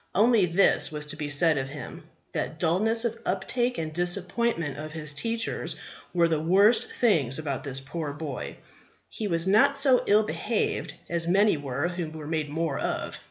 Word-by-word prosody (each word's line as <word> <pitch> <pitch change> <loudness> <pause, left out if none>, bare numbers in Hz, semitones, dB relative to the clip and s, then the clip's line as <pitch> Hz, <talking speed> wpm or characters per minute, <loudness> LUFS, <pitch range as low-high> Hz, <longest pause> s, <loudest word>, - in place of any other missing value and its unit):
Only, 215 -1 +4
this 180 -1 +3
was 150 -1 -4
to 150 - -5
be 150 -1 -4
said 150 0 +4
of 135 0 -4
him, 145 -2 -9 0.3
that 155 - -3
dulness 215 +8 +2
of 230 0 -2
uptake 240 +7 -1
and 155 -1 -4
disappointment 175 - 0
of 155 0 -6
his 150 -3 -4
teachers 230 +9 -2 0.4
were 170 -1 +3
the 160 -2 0
worst 195 +8 +4
things 155 - +2
about 145 -4 -4
this 135 -2 -3
poor 145 +2 -5
boy; 145 -3 -6 0.5
he 215 - -4
was 165 -2 0
not 270 +9 +4
so 270 -3 +4
ill 210 +2 +5
behaved 220 +1 -2
as 170 -1 -2
many 200 +3 +4
were 145 +1 -2
who 175 -2 -4
were 155 -1 -9
made 155 -1 -2
more 160 -1 -2
of. - - -3
170 Hz, 175 wpm, -26 LUFS, 150-210 Hz, 0.5 s, ill